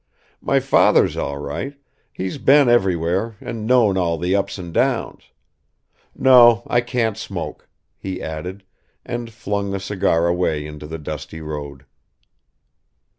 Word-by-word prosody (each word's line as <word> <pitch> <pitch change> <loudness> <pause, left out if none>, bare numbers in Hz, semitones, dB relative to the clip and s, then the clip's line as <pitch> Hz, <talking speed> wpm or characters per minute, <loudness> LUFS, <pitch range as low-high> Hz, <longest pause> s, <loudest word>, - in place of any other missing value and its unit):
My - - +2
father's - - +3
all 70 - -3
right, 100 - -5 0.4
he's 95 +9 -5
been 140 0 +5
everywhere 95 -1 +1
and 115 -3 -6
known 115 -6 +4
all 85 -2 0
the 90 +4 0
ups 100 0 -1
and 85 -3 -8
downs. - - -1 0.9
No, 120 -3 +6
I 120 - +2
can't 120 -3 -1
smoke," 95 -6 -6 0.3
he 95 -1 -5
added, 90 +5 -6 0.4
and 120 -1 -5
flung 100 -3 -3
the 100 0 -2
cigar 95 -4 0
away 85 -4 0
into 75 0 -9
the 80 +1 -6
dusty 80 +1 -7
road. 70 -3 -7
95 Hz, 130 wpm, -20 LUFS, 80-115 Hz, 0.9 s, No